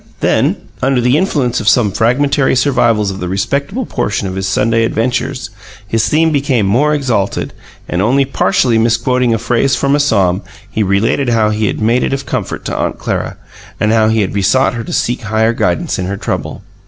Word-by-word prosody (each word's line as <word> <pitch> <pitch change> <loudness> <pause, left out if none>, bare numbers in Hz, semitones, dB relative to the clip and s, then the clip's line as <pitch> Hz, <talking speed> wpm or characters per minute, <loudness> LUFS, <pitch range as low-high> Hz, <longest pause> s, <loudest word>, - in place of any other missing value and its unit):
Then, - - +2 0.3
under 135 0 +2
the 125 +2 +2
influence 140 -8 0
of 105 - +2
some 105 -1 +3
fragmentary 130 +6 +1
survivals 120 -6 +2
of 95 - -7
the 90 - -4
respectable 140 - -2
portion 100 - -2
of 95 - -4
his 95 0 -3
Sunday 115 +4 +1
adventures, 125 +2 -2 0.4
his 110 0 0
theme 160 +4 +2
became 135 -7 +1
more 140 +10 +2
exalted; 120 -9 -1 0.3
and, 90 - -1
only 135 +6 +2
partially 125 -3 +1
misquoting 120 +2 +1
a 115 - +2
phrase 120 +3 +1
from 140 +3 +1
a - - +1
psalm, 100 -9 +2 0.3
he 110 - -1
related 105 +7 +1
how 110 -2 +2
he 105 0 0
had - - -2
made 115 +3 +2
it - - -1
of 135 0 -3
comfort - - -4
to - - -3
Aunt - - -2
Clara, - - -3 0.4
and 105 - +1
how 110 -1 +3
he 110 0 +2
had 95 - -2
besought 105 +8 +2
her 115 -2 -4
to - - -8
seek 120 +1 -1
Higher 110 +2 +1
guidance 90 - -1
in 90 - -2
her 100 +1 -3
trouble. 95 - -4
115 Hz, 195 wpm, -14 LUFS, 105-130 Hz, 0.4 s, some